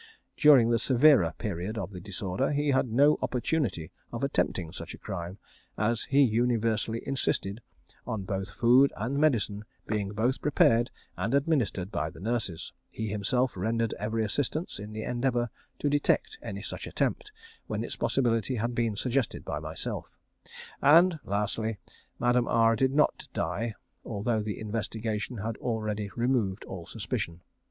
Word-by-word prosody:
During 135 -7 +6
the 115 - +3
severer 130 - +5
period 105 0 -3
of 100 -2 -4
the 90 -2 -8
disorder, 100 +4 -2
he 145 0 +1
had 130 -1 +3
no 140 +6 +4
opportunity 120 - -1 0.2
of - - -4
attempting 85 -3 0
such 85 -1 -7
a - - -16
crime, 95 -2 -6 0.4
as 115 +2 0
he 140 +1 +4
universally 115 -1 +1
insisted 120 -5 -1 0.5
on 110 -5 -2
both 95 +1 -3
food 125 +6 +5
and 125 +7 -1
medicine 110 -8 +1 0.2
being 105 -2 -1
both 120 +5 0
prepared 120 -5 +4 0.3
and 120 - 0
administered 135 - +1
by 80 - -1
the 80 - -13
nurses; 105 -5 -2 0.2
he 110 -1 -4
himself 120 +5 0
rendered 115 +4 0
every 110 +2 -1
assistance 145 - -1
in 105 +1 -7
the 110 0 -5
endeavour 120 -1 0 0.3
to - - -1
detect 145 - +1
any - - -6
such - - -5
attempt 420 - -1 0.4
when - - -2
its - - -4
possibility 120 -1 +1
had 120 +2 -1
been 115 -3 0
suggested 125 +3 -1
by - - -3
myself; - - -5 0.7
and 165 +4 +6
lastly, 105 +2 -1 0.4
Madame 120 0 +2
R 115 0 +4
did 130 +3 +2
not 150 - +2
die, 115 0 -2 0.3
although 110 +1 -1
the 105 -1 -4
investigation 110 +2 -3
had 110 +2 -3
already 110 -3 -2
removed 115 -5 0
all 85 -3 -8
suspicion. 100 -6 -4
115 Hz, 150 wpm, -29 LUFS, 105-125 Hz, 0.7 s, During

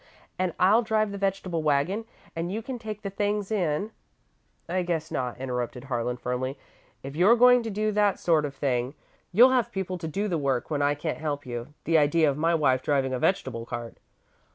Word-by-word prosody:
And 185 -2 -1
I'll 205 +6 +5
drive 215 -2 0
the 200 - -6
vegetable 195 -4 -1
waggon 155 +9 +1 0.3
and 165 +2 -3
you 220 +3 -3
can 255 0 -5
take 215 -2 -7
the 200 - -4
things 205 +1 -1
in 190 0 0 0.4
" - - -43
"I 185 +2 0
guess 170 -3 -2
not," 125 -2 -2
interrupted 125 -1 -4
Harlan, 125 -2 -2
firmly. 125 +2 -3 0.5
"If 135 +1 -7
you're 190 +8 +6
going 250 +1 +6
to 230 - -4
do 215 +1 -1
that 205 -2 +2
sort 160 -3 +2
of 140 -1 -6
thing, 130 -1 -1 0.4
you'll 240 +8 +7
have 240 -2 +1
people 185 -3 -3
to 165 - -4
do 200 +7 -2
the 170 -5 -1
work 135 -1 -1
when 145 -1 0
I 145 0 +2
can't 155 +2 -4
help 145 -2 -3
you. 120 +3 -6
The 165 -1 +3
idea 155 +2 +3
of - - -4
my 165 +3 +2
wife 130 -5 +2
driving 135 -2 0
a 130 - -1
vegetable 130 -10 -1
cart!" 120 -1 -6
165 Hz, 205 wpm, -26 LUFS, 135-200 Hz, 0.5 s, you'll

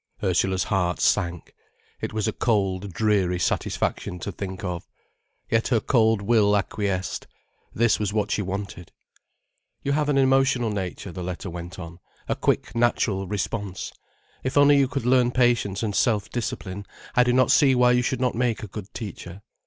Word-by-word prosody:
Ursula's 95 -1 +1
heart 90 -3 0
sank. 85 -1 0 0.5
It - - -3
was 110 0 -1
a 110 - 0
cold, 100 -4 0
dreary 100 -3 +1
satisfaction 90 0 -1
to 100 - -4
think 95 +1 -6
of. 90 -2 -4 0.6
Yet 115 0 +1
her 120 -3 +2
cold 110 -4 +2
will 105 -2 +4
acquiesced. 100 -2 -2 0.4
This 115 0 +2
was 105 -2 -1
what 105 0 -1
she - - +1
wanted. 95 -3 -5 0.9
"You 140 - 0
have 150 +1 +1
an 140 - +2
emotional 135 -3 +3
nature," 95 -1 -4
the 90 - -7
letter 90 +1 -5
went 85 +2 -7
on, 85 -1 -9 0.3
"a - - 0
quick - - 0
natural 115 -5 +1
response. 100 -1 -4 0.5
If 130 +2 -2
only 145 0 +7
you 140 -1 +4
could 135 -2 -4
learn 125 -1 +4
patience 120 -5 +1
and 105 -2 -2
self 105 -5 +1
discipline, 100 -4 -4 0.3
I 125 - +6
do 125 - +2
not 130 0 +4
see 135 -3 +5
why 125 0 +5
you 125 0 +3
should 125 +1 -1
not 125 -1 +1
make 120 0 -1
a - - -5
good 105 -2 -7
teacher. 100 -3 -7
105 Hz, 170 wpm, -24 LUFS, 95-125 Hz, 0.9 s, only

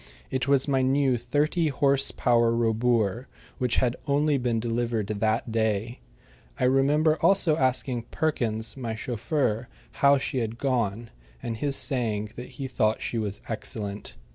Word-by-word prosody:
It 130 0 -1
was 140 -1 +3
my 135 -2 +2
new 135 0 +2
thirty 145 +8 0
horse 140 -1 +2
power 120 -2 +2
Robur, 115 0 +1 0.3
which 125 -2 +1
had 125 -1 +1
only 145 0 +2
been 120 -2 0
delivered 115 -1 -1
that 110 +2 -1
day. 110 +1 -1 0.6
I - - 0
remember 145 +4 +3
also 185 -5 +4
asking 130 -4 0
Perkins, 115 -8 -1
my 120 -4 -4
chauffeur, 120 0 -1 0.3
how 140 0 +6
she 130 -1 -2
had 115 -1 -3
gone, 120 -4 -1 0.3
and 115 -1 -3
his 140 +3 -1
saying 110 -8 -1
that 125 - -8
he 135 - -3
thought 110 -4 0
she 115 - -2
was 105 -2 -3
excellent. 105 -2 -5
120 Hz, 145 wpm, -26 LUFS, 110-135 Hz, 0.6 s, how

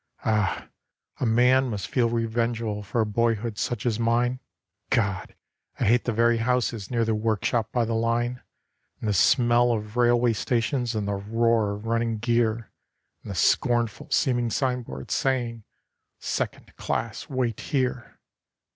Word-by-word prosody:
Ah! 105 -4 0 0.5
a 125 - 0
man 125 +3 +4
must 100 -3 -3
feel 120 +2 +1
revengeful 115 -2 -1
for 110 +3 -1
a - - +2
boyhood 115 0 -1
such 120 -1 -2
as 115 -2 0
mine. 120 +2 +1 0.5
God! 100 -4 -1 0.4
I - - 0
hate 120 +3 +3
the 120 - 0
very 115 +1 +3
houses 115 -3 -1
near 115 -2 +1
the 110 - +1
workshop 110 +1 0
by 120 -2 +1
the 115 - -2
line; 120 +2 0 0.6
And - - -4
the - - +2
smell 120 +2 +4
of 105 -1 -3
railway 120 -1 +4
stations, 120 +2 -1
and 105 -2 -2
the 100 - -1
roar 110 +1 +1
of 105 +2 -10
running 115 0 0
gear, 115 0 0 0.5
And - - -11
the - - -4
scornful 120 +5 +1
seeming 120 -4 +1
signboards, 125 - -2
saying 120 -4 -1 0.5
'Second - - -4
class 115 +6 -3
wait 125 -5 -1
here. 130 -4 -2
115 Hz, 145 wpm, -25 LUFS, 110-120 Hz, 0.6 s, man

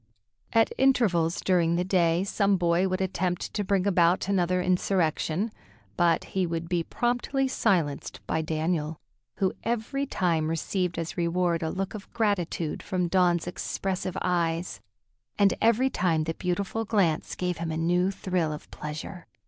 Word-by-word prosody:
At 225 -1 +3
intervals 200 -11 +3
during 170 -3 +2
the 175 - +1
day 175 -2 +2
some 200 0 +2
boy 175 +1 +2
would 185 +1 -1
attempt 180 -1 -2
to 210 - -1
bring 195 -1 +1
about 180 -2 +3
another 180 -2 +1
insurrection, 180 +1 0 0.4
but 170 -2 +3
he 190 -2 +1
would 165 0 -3
be 175 -1 0
promptly 245 - 0
silenced 165 - 0
by 160 - 0
Daniel, 155 0 -1 0.4
who 190 -1 +1
every 240 +5 -1
time 165 - 0
received 175 +2 -1
as 165 +1 -4
reward 170 0 +1
a 160 - -1
look 195 +2 -3
of 210 -2 -9
gratitude 190 -8 -1
from 180 -3 -1
Dawn's 175 -2 +3
expressive 185 +1 -3
eyes; 170 -1 -1 0.6
and 200 -1 +4
every 235 +4 +3
time 165 -4 +1
the 165 +1 -2
beautiful 195 +6 -2
glance 195 -8 +1
gave 180 -2 -2
him 165 -1 -3
a 160 - -2
new 175 +3 +2
thrill 180 -4 -1
of 150 - -8
pleasure. 155 +4 -7
180 Hz, 150 wpm, -27 LUFS, 165-195 Hz, 0.6 s, and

